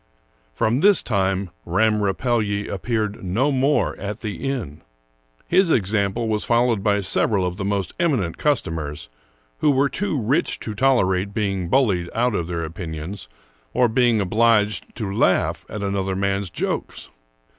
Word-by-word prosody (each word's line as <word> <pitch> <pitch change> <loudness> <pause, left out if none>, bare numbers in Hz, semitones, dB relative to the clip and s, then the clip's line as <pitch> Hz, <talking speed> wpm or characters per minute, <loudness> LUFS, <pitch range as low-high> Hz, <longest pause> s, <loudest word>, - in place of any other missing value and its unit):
From 115 - +1
this 200 +4 +5
time 95 -3 0
Ramm 105 +5 +2
Rapelye 105 0 0
appeared 105 +1 -2
no 115 +11 +1
more 140 +2 +1
at 105 +1 -5
the 110 +5 -4
inn. 95 - -4 0.6
His 185 0 +3
example 100 - +1
was 105 -1 -1
followed 120 -3 +2
by 105 0 +2
several 95 +1 +1
of 90 0 -3
the 100 - -3
most 100 -2 -1
eminent 130 - 0
customers, 80 - -2 0.5
who - - +3
were 140 0 +3
too 175 -5 -2
rich 130 +10 0
to 110 - -4
tolerate 100 -5 +1
being 95 -5 -1
bullied 95 -10 +2
out 120 +1 +1
of 85 -4 -2
their 85 -2 -3
opinions 80 +3 -6 0.5
or 125 - +4
being 120 -1 +2
obliged 105 +1 +2
to 100 -4 -4
laugh - - +1
at 105 0 -5
another 95 -1 -1
man's 100 0 -1
jokes. - - -4
105 Hz, 145 wpm, -22 LUFS, 95-120 Hz, 0.6 s, this